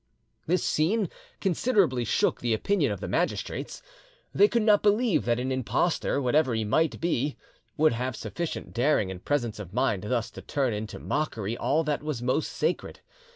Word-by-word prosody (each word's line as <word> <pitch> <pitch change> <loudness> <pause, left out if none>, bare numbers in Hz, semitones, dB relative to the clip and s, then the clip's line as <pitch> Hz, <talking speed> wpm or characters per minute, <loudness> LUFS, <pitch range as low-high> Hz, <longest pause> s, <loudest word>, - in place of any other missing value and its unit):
This 180 +1 +2
scene 190 +5 +1 0.3
considerably 190 - +2
shook - - +1
the 120 -2 +1
opinion 200 - +1
of - - -4
the - - -4
magistrates. - - -2 0.5
They 410 - +6
could 235 - +1
not 210 -2 +5
believe 210 0 +2
that 120 0 +1
an 130 +1 -2
impostor, 130 +5 0
whatever 130 -1 +2
he 110 - 0
might 160 +10 +1
be, 150 -4 -1 0.4
would 155 -2 +4
have 125 +1 -2
sufficient 170 +8 -5
daring 120 -6 +2
and 90 -1 -9
presence 120 -7 -1
of 95 -3 -8
mind 115 -7 +1
thus 120 -1 -1
to - - -9
turn 135 -6 -1
into 105 +1 -5
mockery 115 -8 -2
all 155 +6 +1
that 150 -1 -1
was 150 -4 -3
most 130 +5 0
sacred. - - -2
140 Hz, 170 wpm, -27 LUFS, 120-165 Hz, 0.5 s, They